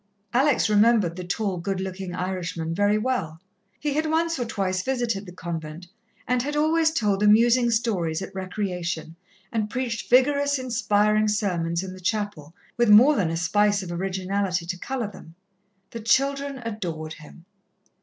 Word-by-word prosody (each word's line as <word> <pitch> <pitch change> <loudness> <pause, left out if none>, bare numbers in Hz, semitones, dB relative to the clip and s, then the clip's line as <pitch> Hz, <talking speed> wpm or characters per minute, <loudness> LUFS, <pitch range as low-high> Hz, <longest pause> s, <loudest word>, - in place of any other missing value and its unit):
Alex 265 +1 +3
remembered 210 -4 +3
the 180 - -6
tall, 190 +1 -2
good 185 +2 -3
looking 190 -1 -5
Irishman 180 -3 -3
very 205 +3 +2
well. 215 -10 -2 0.4
He 295 -1 -1
had 310 +2 0
once 330 -1 0
or 245 - -1
twice 190 -4 -1
visited 235 -5 -2
the - - -8
convent, 165 -1 -6 0.4
and 250 0 +1
had 290 +3 -3
always 315 +2 +3
told 210 -10 0
amusing 235 +3 +5
stories 200 -9 0
at 195 - -8
recreation, 180 -4 -4 0.4
and 215 -2 -1
preached 250 -2 -3
vigorous, 285 +3 +4
inspiring 215 -4 +1
sermons 180 -5 0
in 185 -1 -6
the 185 - -11
chapel, 185 -6 -3 0.2
with 240 -2 +3
more 245 +9 +8
than 190 -9 +1
a 165 - -2
spice 205 +3 +2
of 175 - -7
originality 190 0 -2
to 180 +1 -4
colour 260 +1 -3
them. 165 -4 -14 0.6
The 230 - -6
children 275 +3 0
adored 170 -8 -4
him. 160 +2 -14
205 Hz, 155 wpm, -25 LUFS, 180-240 Hz, 0.6 s, more